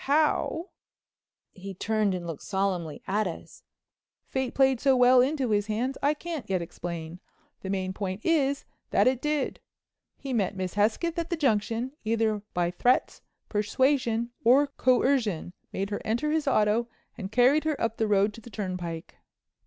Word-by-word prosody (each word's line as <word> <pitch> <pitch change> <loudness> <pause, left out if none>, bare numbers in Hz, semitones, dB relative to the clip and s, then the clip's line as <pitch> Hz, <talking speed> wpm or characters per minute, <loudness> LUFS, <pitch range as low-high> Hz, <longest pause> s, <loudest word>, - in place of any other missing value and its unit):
How," 310 +4 +1 0.8
he 195 0 -9
turned 215 0 0
and 175 -1 -5
looked 165 -4 -6
solemnly 190 -5 -2
at 210 +1 0
us, 180 - -9 0.6
fate 265 -2 -3
played 265 -2 +4
so 270 -2 +4
well 250 0 +6
into 265 -2 0
his 205 0 +1
hands 240 +5 -1
I 290 +2 +2
can't 320 -5 -6
yet 190 -1 +1
explain—the 170 +2 -8
main 190 -1 -2
point 195 0 -4
is 285 -4 +2 0.2
that - - +3
it 255 -1 +2
did. 300 -2 -1 0.6
He 270 -2 -5
met 205 -4 0
Miss 185 -1 -3
Hesketh 230 - +1
at 335 - -3
the 340 - -1
Junction, 235 -2 0
either 220 -1 +1
by 175 -1 +1
threats, 245 +8 +1 0.3
persuasion 235 +2 +1
or 260 +5 +6
coercion 245 - +2 0.2
made 195 +1 -3
her 205 - -2
enter 240 +7 0
his 310 -2 0
auto 220 -2 +2 0.3
and 195 -3 -6
carried 255 +6 +4
her 310 -2 0
up 230 0 -1
the 220 - +1
road 205 0 +3
to 230 - -11
the 235 - -12
turnpike. 180 -5 -5
225 Hz, 160 wpm, -27 LUFS, 195-265 Hz, 0.8 s, well